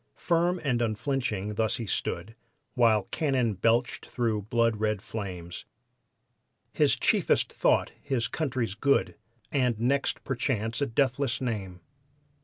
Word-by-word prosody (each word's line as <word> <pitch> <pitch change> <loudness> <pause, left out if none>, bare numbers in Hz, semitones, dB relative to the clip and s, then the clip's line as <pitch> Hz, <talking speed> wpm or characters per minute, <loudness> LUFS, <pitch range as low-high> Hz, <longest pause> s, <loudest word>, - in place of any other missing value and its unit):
Firm 175 +1 +1
and 125 -5 +1
unflinching 110 -3 -1
thus 110 +2 0
he 115 - -4
stood, 95 +1 -3 0.4
While 115 -4 +4
cannon 130 -8 +1
belched 115 +6 +1
through 115 -4 -1
blood 115 -2 +2
red 105 -1 0
flames; 95 -5 -6 1.1
His - - +4
chiefest - - +2
thought - - +2
his 130 -6 -1
country's 130 -5 -2
good, 140 +6 +2 0.4
And 125 -5 +1
next 135 +4 0
perchance 120 -2 -1
a 140 - +2
deathless 130 +2 +1
name. 100 -8 -4
115 Hz, 120 wpm, -28 LUFS, 105-135 Hz, 1.1 s, While